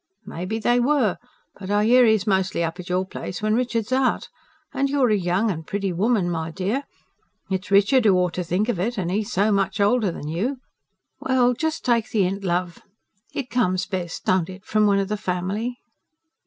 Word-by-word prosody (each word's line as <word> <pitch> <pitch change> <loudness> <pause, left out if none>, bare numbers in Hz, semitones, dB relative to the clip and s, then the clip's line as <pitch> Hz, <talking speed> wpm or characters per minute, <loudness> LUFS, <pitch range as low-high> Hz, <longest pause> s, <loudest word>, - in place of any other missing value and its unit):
"May 175 +2 -6
be 220 +4 -2
they 240 +2 +2
were. 250 -6 +2 0.4
But 190 -1 -7
I 205 +1 +2
hear 250 +2 +6
'e's 220 -3 +3
mostly 190 -4 +1
up 165 +2 -3
at 180 - -8
your 185 +1 0
place 185 - -6
when 215 0 0
Richard's 235 -1 -1
out. 260 0 +1 0.4
And 275 0 0
you're 270 -4 +2
a - - +4
young 190 +3 +1
and 160 -3 -6
pretty 195 -2 -2
woman, 205 +1 +1
my 165 -2 -2
dear; 195 - -2 0.7
it's 190 +1 -2
Richard 205 +5 +4
who 200 -3 +5
ought 180 -1 +1
to 180 - -2
think 180 +5 0
of 235 -8 -1
it, 230 +6 -1
and 180 -3 -2
he 210 +3 0
so 210 -1 +1
much 195 -2 0
older 205 -1 +2
than 150 - -7
you. 205 - -2 0.6
Well, 250 -1 +2
just 315 +5 -3
take 235 -3 +2
the 210 -3 +2
hint, 195 +2 -2
love. 175 -1 -2 0.5
It 260 -3 -4
comes 185 -7 +1
best, 185 -4 -5
don't 185 -2 +2
it, 185 0 -11
from 215 -1 +2
one 200 -1 +3
of 195 -1 0
the 210 +1 -2
family?" 200 +6 -3
200 Hz, 205 wpm, -23 LUFS, 185-235 Hz, 0.7 s, hear